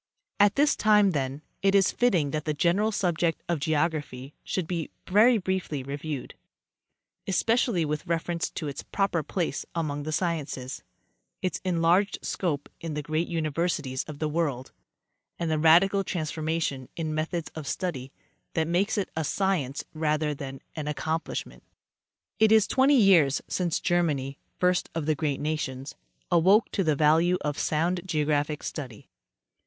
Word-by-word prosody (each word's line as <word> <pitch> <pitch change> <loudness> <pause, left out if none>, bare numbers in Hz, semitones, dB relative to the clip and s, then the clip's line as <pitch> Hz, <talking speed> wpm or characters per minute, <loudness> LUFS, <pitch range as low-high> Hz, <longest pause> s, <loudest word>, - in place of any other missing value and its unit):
At 205 0 +5
this 290 +1 +3
time, 210 -2 +4
then, 140 -1 -3 0.2
it 195 0 +3
is 195 -1 +4
fitting 180 - +2
that 155 0 -3
the 155 -1 -1
general 185 +8 +2
subject 175 -4 0
of 170 -3 0
geog 155 +3 +2
raphy 140 -3 -7
should 185 - -2
be 165 -1 -3 0.2
very 220 +5 +5
briefly 185 -8 -2
reviewed, 140 +1 -5 0.9
especially 225 -2 +2
with 150 0 -3
reference 170 0 -1
to 155 - -5
its 140 - -5
proper 195 -4 0
place 175 +2 -2
among 150 -3 -2
the 155 +2 -4
sciences, 150 -6 -2 0.6
its 185 - -2
enlarged 180 +3 +2
scope 150 -6 -2
in 165 -2 -5
the 150 - -3
ereat 155 +3 -1
universities 155 -4 -1
of 150 -2 -8
the 155 - -1
world, 145 -5 -2 0.7
and 170 -2 -2
the 155 - +1
radical 180 +5 +5
transformation 155 -5 -2
in 160 -2 -3
methods 160 +2 -2
of 155 -3 -7
study 140 -9 -3 0.4
that 160 -1 +1
makes 185 +6 +1
it 200 - -1
a 160 - -1
science 155 -6 -1
rather 155 -1 0
than 135 -2 -7
an 155 -2 -4
accom 160 +2 -2
plishment. - - -6 0.8
It 220 -1 +5
is 220 -2 +6
twenty 270 +2 +4
years 170 - +5
since 175 -3 -1
Germany, 150 -6 0 0.2
first 180 0 +1
of 165 -3 -2
the 155 - +2
great 145 -2 -2
nations, 145 -3 -3 0.4
awoke 190 +6 +4
to 195 - 0
the 155 -3 +2
value 160 +5 +4
of 145 -1 -2
sound 170 +4 0
geographic 150 -3 0
study. 125 -8 -7
160 Hz, 155 wpm, -27 LUFS, 150-180 Hz, 0.9 s, is